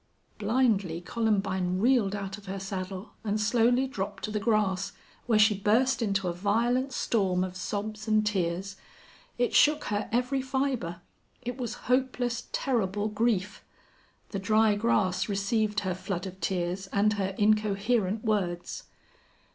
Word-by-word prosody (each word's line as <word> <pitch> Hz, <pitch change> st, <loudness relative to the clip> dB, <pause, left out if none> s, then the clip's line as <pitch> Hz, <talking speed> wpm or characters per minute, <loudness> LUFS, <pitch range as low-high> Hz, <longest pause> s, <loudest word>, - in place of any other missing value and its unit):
Blindly 205 Hz, -6 st, +1 dB
Columbine 190 Hz, -2 st, 0 dB
reeled 220 Hz, -2 st, +3 dB
out 195 Hz, -1 st, -4 dB
of 205 Hz, -1 st, -15 dB
her 195 Hz, +1 st, -4 dB
saddle 190 Hz, +1 st, -5 dB
and 215 Hz, -1 st, -1 dB
slowly 240 Hz, +4 st, +3 dB
dropped 200 Hz, -7 st, -5 dB
to 215 Hz, -, -2 dB
the 210 Hz, -, -1 dB
grass, 205 Hz, -3 st, +1 dB, 0.3 s
where 225 Hz, -3 st, +4 dB
she 215 Hz, 0 st, +6 dB
burst 230 Hz, +7 st, +2 dB
into 200 Hz, -4 st, 0 dB
a 175 Hz, -, 0 dB
violent 235 Hz, +8 st, +1 dB
storm 190 Hz, -7 st, +1 dB
of 185 Hz, -1 st, -5 dB
sobs 215 Hz, +3 st, -4 dB
and 215 Hz, 0 st, +3 dB
tears. 190 Hz, -1 st, -1 dB, 0.6 s
It 245 Hz, 0 st, +1 dB
shook 300 Hz, 0 st, +5 dB
her 205 Hz, +1 st, -1 dB
every 250 Hz, +3 st, +1 dB
fiber. 260 Hz, -10 st, -2 dB, 0.4 s
It 245 Hz, 0 st, -3 dB
was 240 Hz, -1 st, -3 dB
hopeless, 250 Hz, -1 st, 0 dB
terrible 210 Hz, -5 st, 0 dB
grief. 210 Hz, -2 st, 0 dB, 0.7 s
The 195 Hz, -, -3 dB
dry 215 Hz, +2 st, +3 dB
grass 205 Hz, -3 st, +1 dB
received 210 Hz, +1 st, 0 dB
her 190 Hz, -2 st, -1 dB
flood 185 Hz, 0 st, -4 dB
of 190 Hz, 0 st, -8 dB
tears 185 Hz, +1 st, -2 dB
and 205 Hz, +2 st, +2 dB
her 195 Hz, -2 st, -2 dB
incoherent 215 Hz, 0 st, +1 dB
words. 180 Hz, -5 st, -1 dB
210 Hz, 140 wpm, -28 LUFS, 190-230 Hz, 0.7 s, she